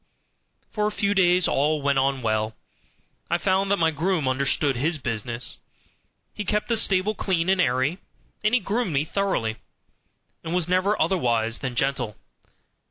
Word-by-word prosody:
For 210 -1 +1
a - - -1
few 205 -1 0
days 180 -2 +4
all 150 +1 +1
went 140 -1 +2
on 135 -1 0
well. 110 0 0 0.7
I - - +2
found 190 +1 +1
that 200 - +3
my 165 -1 +2
groom 160 -1 0
understood 135 +1 +1
his 155 +7 0
business. 120 -2 -4 0.7
He 210 - -4
kept 210 +3 -1
the 230 - +2
stable 200 -1 +2
clean 185 -4 -1
and 190 -1 +3
airy, 130 +7 +1 0.4
and 215 +3 +3
he 250 - +2
groomed 205 -2 -1
me 140 +2 +1
thoroughly; 155 - -1 0.9
and 165 +2 -3
was 180 -2 +1
never 185 +3 +1
otherwise 115 -10 +1
than 130 -3 -4
gentle. 125 -4 -1
160 Hz, 160 wpm, -24 LUFS, 130-195 Hz, 0.9 s, days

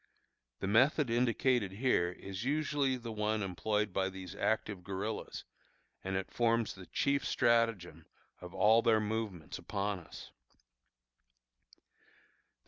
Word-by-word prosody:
The - - -1
method 130 +5 +3
indicated 120 -3 +2
here 100 -6 +1
is 95 +2 -7
usually 145 -1 +1
the 115 -2 -7
one 105 0 -1
employed 105 +2 -1
by 95 0 +1
these 95 -1 -8
active 105 -4 -1
guerillas, 100 +3 -4 0.6
and 95 0 -2
it 95 0 -3
forms 115 -1 +1
the 95 -2 -12
chief 140 0 +1
stratagem 115 -7 +1 0.3
of 90 0 -9
all 105 +5 +5
their 115 -2 +4
movements 105 -6 -3
upon 100 -1 -2
us. 85 - -11
110 Hz, 120 wpm, -33 LUFS, 95-120 Hz, 0.6 s, all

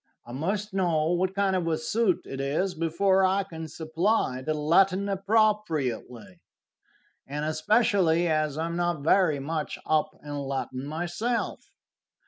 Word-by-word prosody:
I 120 - -10
must 195 +10 -3
know 170 -4 +1
what 185 +2 0
kind 195 -1 +1
of 175 -2 -1
a 160 -1 +1
suit 195 +4 +1
it 135 0 -5
is 155 +8 -1
before 180 +4 +2
I 190 +1 +2
can 160 -3 -8
supply 160 - -1
the 155 +4 -2
Latin 185 +6 +3
appropriately, 195 - 0 0.9
and 145 +2 -3
especially 175 +1 +2
as 155 -2 0
I 160 - -1
am 170 0 -3
not 175 -4 -1
very 160 -3 +3
much 155 +2 -3
up 155 0 +1
in 145 -1 -7
Latin 135 -1 -4
myself." 175 +10 -3
165 Hz, 140 wpm, -27 LUFS, 155-195 Hz, 0.9 s, Latin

